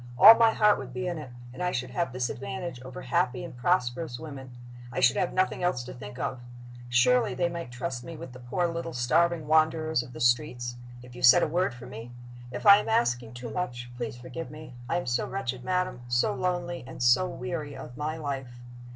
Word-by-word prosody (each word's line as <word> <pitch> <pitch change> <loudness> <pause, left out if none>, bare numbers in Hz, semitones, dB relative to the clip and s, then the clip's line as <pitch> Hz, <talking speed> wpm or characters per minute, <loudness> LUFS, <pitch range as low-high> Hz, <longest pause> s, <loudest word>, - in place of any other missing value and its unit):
All 215 - +12
my 230 -1 +5
heart 210 -1 +4
would 125 -2 -8
be 125 - -2
in 175 -3 -2
it; 145 -4 -8 0.2
and 130 - -8
I 180 0 +1
should 125 -3 -3
have 170 +1 -1
this 125 -1 -1
advantage 130 +3 -5
over 130 0 -8
happy 125 0 0
and - - -8
prosperous 125 -1 0
women 140 -4 -8 0.4
I 130 - -3
should 125 0 +5
have 180 - 0
nothing 185 0 0
else 175 -9 0
to 125 - -8
think 125 -1 -9
of. 130 -1 -3 0.5
Surely 125 0 +3
they 175 +5 +1
might 170 -6 -6
trust 120 0 -4
me 165 +2 -8
with 130 - -9
the 125 - -11
poor 125 +9 -1
little 165 0 -4
starving 160 +6 +2
wanderers 155 -1 +2
of 120 0 -11
the - - -9
streets 120 0 +1 0.3
if 125 0 -13
you 120 - -9
said 125 0 +7
a - - +2
word 175 -4 0
for 120 - -10
me? 115 +3 -9 0.4
If 125 - -7
I 200 -1 +10
am 210 - -2
asking 120 - +1
too 120 -2 -7
much, 120 -6 -4
please 120 -1 -5
forgive 125 +7 -7
me. 155 -3 -10 0.2
I 170 - +1
am 175 - -3
so 120 0 0
wretched, 130 -1 -4
madam 180 -9 -1
so 120 0 +2
lonely 175 -3 -2
and 130 - -5
so 125 +10 +4
weary 145 +3 -5
of 125 - -9
my 155 +3 -3
life. 135 -5 -5
130 Hz, 220 wpm, -28 LUFS, 125-170 Hz, 0.5 s, All